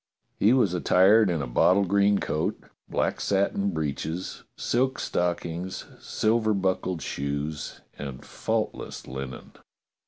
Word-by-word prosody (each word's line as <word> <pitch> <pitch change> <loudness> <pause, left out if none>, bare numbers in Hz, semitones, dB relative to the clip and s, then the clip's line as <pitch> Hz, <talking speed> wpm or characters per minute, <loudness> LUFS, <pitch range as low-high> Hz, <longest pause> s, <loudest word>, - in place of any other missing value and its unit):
He 105 - +5
was 120 -8 +3
attired 95 +4 +5
in 80 -5 0
a - - -4
bottle 95 +11 +4
green 100 +2 +3
coat, 75 - -1 0.3
black - - 0
satin 100 0 +1
breeches, 80 +1 -3 0.2
silk 130 +2 +1
stockings, 90 +1 -2
silver 110 -1 +1
buckled 95 -3 -1
shoes, 70 +2 -4 0.2
and 70 -3 -6
faultless - - -3
linen. 65 0 -7
90 Hz, 115 wpm, -26 LUFS, 75-100 Hz, 0.3 s, He